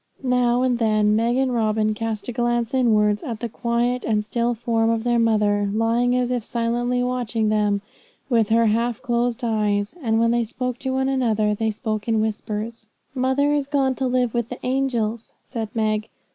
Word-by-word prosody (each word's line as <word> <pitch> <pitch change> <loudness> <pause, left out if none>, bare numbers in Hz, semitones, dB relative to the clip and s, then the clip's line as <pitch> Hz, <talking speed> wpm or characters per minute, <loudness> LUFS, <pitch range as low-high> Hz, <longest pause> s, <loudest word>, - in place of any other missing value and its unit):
Now 250 -1 +2
and 250 -2 +1
then 215 -2 +3
Meg 235 +3 +1
and 265 -1 +1
Robin 215 -2 +1
cast 220 -1 -4
a - - -2
glance 240 0 -1
inwards 210 -5 +3
at 230 -3 -5
the 235 - -3
quiet 240 +2 -1
and 210 -2 0
still 235 +2 0
form 225 0 0
of 225 -1 0
their 240 -1 +2
mother, 210 -3 +2
lying 230 +3 +1
as 250 0 0
if 245 -3 -1
silently 240 +2 -1
watching 240 -3 -1
them 210 -1 +1 0.4
with 230 -5 +2
her 230 +1 +4
half 230 +1 0
closed 240 +1 -1
eyes, 210 -3 0
and 225 -3 +1
when 230 0 +3
they 235 0 +2
spoke 250 +2 -4
to 265 - -2
one 265 0 0
another 225 -6 +1
they 220 +1 -1
spoke 215 -1 -3
in 225 -1 +2
whispers. 220 +1 -3 0.3
'Mother 265 +2 +1
is 290 -2 0
going 275 -2 +1
to 260 0 -2
live 250 -2 +1
with 235 -1 -1
the 250 - -6
angels,' 240 -4 -1
said 225 -4 -4
Meg. 215 -1 0
230 Hz, 185 wpm, -22 LUFS, 215-245 Hz, 0.4 s, her